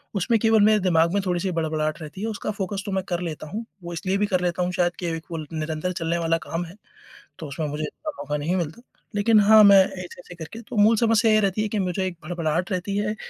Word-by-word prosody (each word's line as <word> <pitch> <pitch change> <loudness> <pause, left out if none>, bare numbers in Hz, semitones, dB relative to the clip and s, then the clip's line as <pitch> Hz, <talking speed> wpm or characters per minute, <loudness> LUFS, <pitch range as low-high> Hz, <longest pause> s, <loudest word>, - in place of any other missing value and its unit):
उसमें 225 +4 +2
केवल 220 -1 +4
मेरे 215 0 +5
दिमाग 170 -3 +2
में 200 - +2
थोड़ी-सी 180 +1 -1
बड़बड़ाहट 155 -1 -1
रहती 155 +5 -8
है, 220 - -2
उसका 215 -1 -3
फोकस 200 -1 -4
तो - - -2
मैं 190 - 0
कर 175 -1 -1
लेता 155 -1 -6
हूँ। 220 +9 -5 0.2
वो 170 0 -6
इसलिए 190 +3 -1
भी 210 - +2
कर 185 -3 0
लेता 180 0 0
हूँ 180 - -1
शायद 175 -1 +1
कि 175 - -4
एक 160 - -10
वो 165 - -3
ल 155 - -5
निरंतर 155 +2 -2
चलने 170 0 -1
वाला 165 0 +1
काम 165 +2 -3
है, 170 +3 -12 0.6
तो 160 - -6
उसमें 150 +2 -4
मुझे 150 +1 -4
इतना 305 - -5
मौका 150 0 -3
नहीं 165 +5 -1
मिलता। 170 +5 -3 0.3
लेकिन 215 +2 +4
हाँ, 215 +1 +7
मैं 200 -1 +8
ऐसे-ऐसे 180 -1 -9
करके 170 +8 -9
तो 230 - -9
मूल 215 +2 +6
समस्या 225 0 +3
ये 215 - +5
रहती 200 +1 0
है 215 - -1
कि 210 - -2
मुझे 185 0 -1
एक 175 -3 -6
भड़भड़ाहट 170 +2 -2
रहती 195 +2 -2
है, 210 +1 -1
180 Hz, 255 wpm, -24 LUFS, 165-205 Hz, 0.6 s, मैं